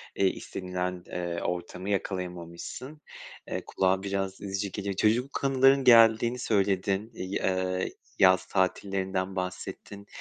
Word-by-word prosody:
eee, 95 Hz, -, +3 dB
istenilen, 90 Hz, -1 st, -4 dB
ııı, 85 Hz, -1 st, -3 dB
ortamı 90 Hz, +2 st, -4 dB
yakalayamamışsın. 90 Hz, -, -4 dB, 0.5 s
Eee, -, -, -4 dB
kulağa 95 Hz, 0 st, +1 dB
biraz 95 Hz, -1 st, -3 dB
üzücü 100 Hz, 0 st, -3 dB
geliyor. 100 Hz, -1 st, -3 dB
Çocukluk 120 Hz, +9 st, +1 dB
anıların 135 Hz, 0 st, +4 dB
geldiğini 115 Hz, 0 st, +6 dB
söyledin, 100 Hz, -1 st, 0 dB
i 95 Hz, +1 st, -3 dB
ııı, 95 Hz, 0 st, 0 dB, 0.3 s
yaz 95 Hz, -1 st, +5 dB
tatillerinden 95 Hz, 0 st, -1 dB
bahsettin. 100 Hz, +2 st, -6 dB
95 Hz, 110 wpm, -28 LUFS, 90-105 Hz, 0.5 s, geldiğini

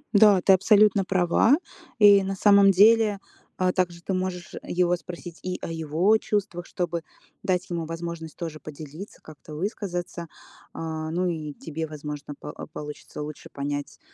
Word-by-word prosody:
Да, 205 Hz, -2 st, +7 dB
ты 190 Hz, -, +6 dB
абсолютно 200 Hz, +1 st, +5 dB
права. 185 Hz, -, +3 dB, 0.4 s
И 200 Hz, -2 st, +7 dB
на 195 Hz, 0 st, -3 dB
самом 200 Hz, 0 st, +6 dB
деле, 210 Hz, +1 st, +5 dB, 0.4 s
а, 185 Hz, -1 st, +1 dB
также 175 Hz, -2 st, -1 dB
ты 190 Hz, -, -3 dB
можешь 185 Hz, -1 st, -3 dB
его 175 Hz, 0 st, +1 dB
спросить 175 Hz, -1 st, -9 dB
и 185 Hz, 0 st, -3 dB
о -, -, -5 dB
его 165 Hz, +6 st, +2 dB
чувствах, 195 Hz, -5 st, -2 dB
чтобы 170 Hz, -2 st, -3 dB, 0.4 s
дать 185 Hz, 0 st, 0 dB
ему 170 Hz, -2 st, -3 dB
возможность 165 Hz, -1 st, -6 dB
тоже 165 Hz, -3 st, -5 dB
поделиться, 155 Hz, +5 st, -10 dB
как-то 155 Hz, 0 st, -12 dB
высказаться. 175 Hz, -1 st, -4 dB, 0.5 s
А, 160 Hz, -1 st, -4 dB
ну 180 Hz, +2 st, 0 dB
и 155 Hz, -4 st, -3 dB
тебе, 160 Hz, +2 st, -5 dB
возможно, 150 Hz, -1 st, -7 dB
по -, -, -8 dB
а, -, -, -8 dB
получится 150 Hz, 0 st, -8 dB
лучше 150 Hz, 0 st, -8 dB
понять, 145 Hz, 0 st, -4 dB
175 Hz, 155 wpm, -25 LUFS, 160-195 Hz, 0.5 s, Да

